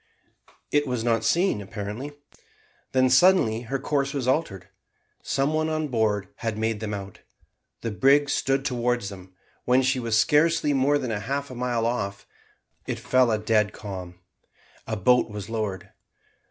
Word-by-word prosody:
It 145 0 +2
was 125 -3 -2
not 115 -1 +1
seen 170 - +2
apparently. 105 +8 -6 0.8
Then 130 0 +3
suddenly 130 -5 +4
her 135 - 0
course 140 0 -1
was 130 -3 -2
altered. 120 - -1 0.5
Some 140 +3 0
one 155 0 0
on 155 -1 -2
board 105 -5 0
had 115 -2 -3
made 110 0 -1
them 110 -1 -4
out. 100 -2 -6 0.6
The 115 - -3
brig 135 +8 +4
stood 135 0 0
towards 120 -4 0
them. 95 -2 -12 0.3
When 125 +1 +4
she 130 0 +1
was 115 -3 0
scarcely 150 +5 +3
more 140 +2 +3
than 130 -4 -3
half 135 +7 -3
a - - -6
mile 120 -2 -1
off, 100 -5 -2 0.6
it - - -2
fell 130 -1 +2
a 110 - +2
dead 105 -1 +1
calm. 95 -4 -7 0.7
A 110 - -2
boat 125 +4 +3
was 105 +1 -7
lowered. 105 -5 -3
120 Hz, 155 wpm, -25 LUFS, 105-135 Hz, 0.8 s, suddenly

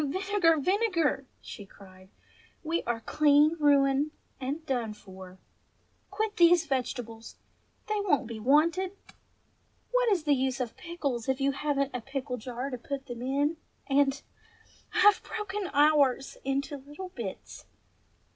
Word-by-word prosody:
"Oh, - - -1
Vinegar, 375 0 +2
Vinegar!" 335 - +1
she 205 - -9
cried. 185 -1 -16 0.5
"We 330 +2 -1
are 235 -1 -1
clean 300 +4 +4
ruined 285 0 +3 0.3
and 280 +5 -4
done 235 -6 -2
for! 190 -2 -12 0.7
Quit 435 -1 -2
these 345 -1 +6
vegetables! 245 -4 -4 0.5
they 425 -1 -1
won't 360 -10 +1
be 225 -1 -7
wanted! 335 - +2 0.9
What - - +3
is 360 -6 +1
the 295 -2 +3
use 265 0 0
of 245 -3 -3
pickles 280 -9 -4
if 265 0 +1
you 275 0 +2
haven't 275 0 -1
a 250 - -3
pickle 270 0 -4
jar 250 +3 -5
to 250 - -5
put 275 +2 -5
them 240 -3 -7
in, 285 +5 0 0.3
and 275 0 +2 0.4
— - - -29
I've 415 - +6
broken 415 -2 -4
ours 285 -3 +3
— - - -36
into 275 +2 -2
little 295 +7 -9
bits 230 - -8
280 Hz, 145 wpm, -29 LUFS, 250-330 Hz, 0.9 s, these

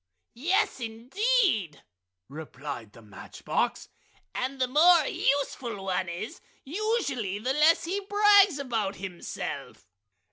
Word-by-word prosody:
"Yes 370 - 0
indeed!" 235 - 0 0.4
replied 140 -6 -8
the 115 - -15
match 105 -2 -13
box. - - -1 0.5
"And 265 +1 -3
the 255 - +2
more 315 +4 +5
useful 255 -9 -1
one 185 -1 -1
is, 175 +7 -6 0.2
usually, 285 - -2
the 250 +5 -1
less 305 +3 +4
he 370 +4 -2
brags 405 -3 +5
about 225 -8 -2
himself!" 185 -2 -7
255 Hz, 110 wpm, -27 LUFS, -, 0.5 s, more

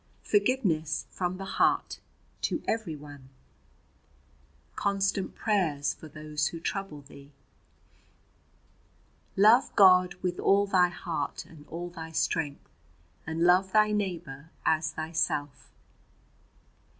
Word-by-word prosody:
"Forgiveness 205 - +1
from 180 0 -3
the 195 - -6
heart - - +1 0.4
to - - -1
everyone. 150 -10 -5 1.5
"Constant 195 -1 -1
prayers 155 -10 0
for 160 - -12
those 150 0 -3
who 165 - -6
trouble 165 -3 -4
thee. 140 0 -15 2.1
"Love 220 +6 +6
God 180 -2 +6
with 180 -1 -2
all 200 +1 +4
thy 185 -3 +3
heart 165 -4 -4
and 150 -2 -16
all 175 +2 -6
thy 165 -2 -8
strength, 155 -2 -2 0.6
and 160 +1 -3
love 185 +2 +4
thy 215 0 +4
neighbour 170 -8 -4 0.2
as 155 0 +2
thyself." 155 -3 -2
170 Hz, 100 wpm, -28 LUFS, 155-195 Hz, 2.1 s, Love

